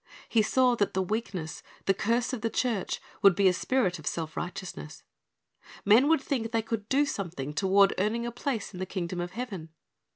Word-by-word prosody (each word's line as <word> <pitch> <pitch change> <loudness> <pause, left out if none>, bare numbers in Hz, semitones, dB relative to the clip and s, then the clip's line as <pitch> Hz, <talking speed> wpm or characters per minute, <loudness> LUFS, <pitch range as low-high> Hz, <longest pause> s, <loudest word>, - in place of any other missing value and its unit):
He 225 - +3
saw 250 +3 +3
that 205 -3 0
the 190 - +2
weakness, 185 -6 -4 0.2
the 195 - +4
curse 230 +5 0
of 245 - -3
the 230 - 0
church, 230 -5 -1 0.2
would 195 -3 +7
be 200 0 +4
a 185 - +5
spirit 185 -2 0
of 155 - -9
self 160 -2 -3
righteousness. 180 -4 -6 0.8
Men 225 +7 +6
would 320 -2 +4
thinl: 250 -6 -2
they 225 -1 +1
could 220 -2 -4
do 280 +2 +3
something 165 - -4
toward 195 +3 +4
earning 220 +4 0
a 240 - -3
place 235 -3 -3
in 180 - -8
the 185 - -3
kingdom 180 -2 -3
of 175 +1 -5
heaven. 200 -9 -5
205 Hz, 195 wpm, -28 LUFS, 180-235 Hz, 0.8 s, would